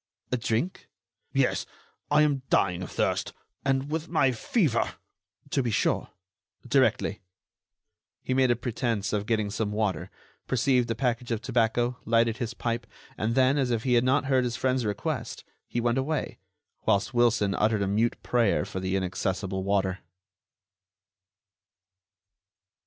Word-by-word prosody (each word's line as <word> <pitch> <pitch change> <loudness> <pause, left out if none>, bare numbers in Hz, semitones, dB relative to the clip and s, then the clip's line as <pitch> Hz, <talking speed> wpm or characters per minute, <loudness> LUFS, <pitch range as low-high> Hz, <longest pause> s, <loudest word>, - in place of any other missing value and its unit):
"A 125 - +2
drink?" 120 +10 -2 0.4
"Yes, - - +1 0.4
I 150 +1 +5
am 145 -3 +1
dying 90 -1 +2
of 90 - -5
thirst; - - -1 0.3
and 135 +1 0
with 160 +1 -2
my 135 - +3
fever——" 130 - 0 0.6
"To - - +2
be 120 - -1
sure—directly——" 110 +3 -1 1.0
He 130 - -1
made 130 -1 +3
a 120 - +4
pretense 115 -3 -2
of 105 0 -1
getting 110 -3 0
some 105 -1 -2
water, 105 -6 -1 0.4
perceived 125 -1 +2
a 115 - 0
package 120 -1 -1
of 115 -2 0
tobacco, 120 +1 0
lighted 115 0 +2
his 120 -2 -4
pipe, 115 0 -2 0.3
and 115 +2 -1
then, 135 +2 +4
as 130 -2 +1
if 115 -2 0
he 125 - +1
had 120 0 +4
not 130 +3 +2
heard 130 -2 +3
his 120 -1 -2
friend's 130 -3 +1
request, 105 - -3 0.2
he 120 - -2
went 120 +2 +1
away, 155 +4 -2 0.5
whilst 100 +6 +2
Wilson 115 -4 +3
uttered 105 0 +2
a - - -1
mute 110 +4 0
prayer 115 -7 +2
for 100 -1 -5
the 95 0 -1
inaccessible 95 0 -2
water. 95 -1 0
115 Hz, 145 wpm, -27 LUFS, 105-130 Hz, 1.0 s, I